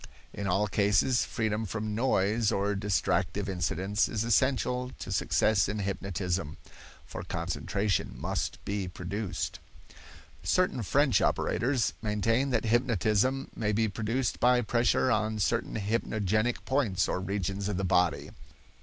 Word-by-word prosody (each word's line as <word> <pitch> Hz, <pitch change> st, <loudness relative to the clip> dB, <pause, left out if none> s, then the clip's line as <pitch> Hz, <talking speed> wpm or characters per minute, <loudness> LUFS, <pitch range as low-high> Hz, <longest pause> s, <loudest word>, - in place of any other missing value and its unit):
In 100 Hz, -, -4 dB
all 95 Hz, +3 st, +2 dB
cases, 105 Hz, +5 st, +2 dB
freedom 110 Hz, -1 st, -1 dB
from 110 Hz, +1 st, -3 dB
noise 110 Hz, -2 st, +1 dB
or 100 Hz, +1 st, 0 dB
distractive 100 Hz, 0 st, 0 dB
incidents 95 Hz, +2 st, 0 dB
is 110 Hz, -1 st, -1 dB
essential 125 Hz, +1 st, +1 dB
to -, -, -7 dB
success 105 Hz, -4 st, +2 dB
in 105 Hz, -, -2 dB
hypnotism, 95 Hz, -4 st, -3 dB, 0.5 s
for -, -, -7 dB
concentration 100 Hz, 0 st, -2 dB
must -, -, -2 dB
be 100 Hz, -2 st, -2 dB
produced. 95 Hz, +3 st, -4 dB, 0.8 s
Certain 180 Hz, -9 st, +1 dB
French 130 Hz, +1 st, +3 dB
operators 120 Hz, -, +1 dB
maintain 115 Hz, +5 st, +1 dB
that 115 Hz, -3 st, 0 dB
hypnotism 120 Hz, +2 st, +1 dB
may 105 Hz, -1 st, 0 dB
be 110 Hz, +1 st, +2 dB
produced 115 Hz, +4 st, -2 dB
by 125 Hz, 0 st, +4 dB
pressure 120 Hz, +2 st, +2 dB
on 110 Hz, 0 st, 0 dB
certain 115 Hz, +3 st, 0 dB
hypnogenic 110 Hz, +1 st, 0 dB
points 115 Hz, -10 st, +1 dB
or -, -, -1 dB
regions 100 Hz, +1 st, -2 dB
of 100 Hz, -, -2 dB
the 95 Hz, -, -1 dB
body. 90 Hz, -4 st, +1 dB
105 Hz, 125 wpm, -29 LUFS, 100-115 Hz, 0.8 s, by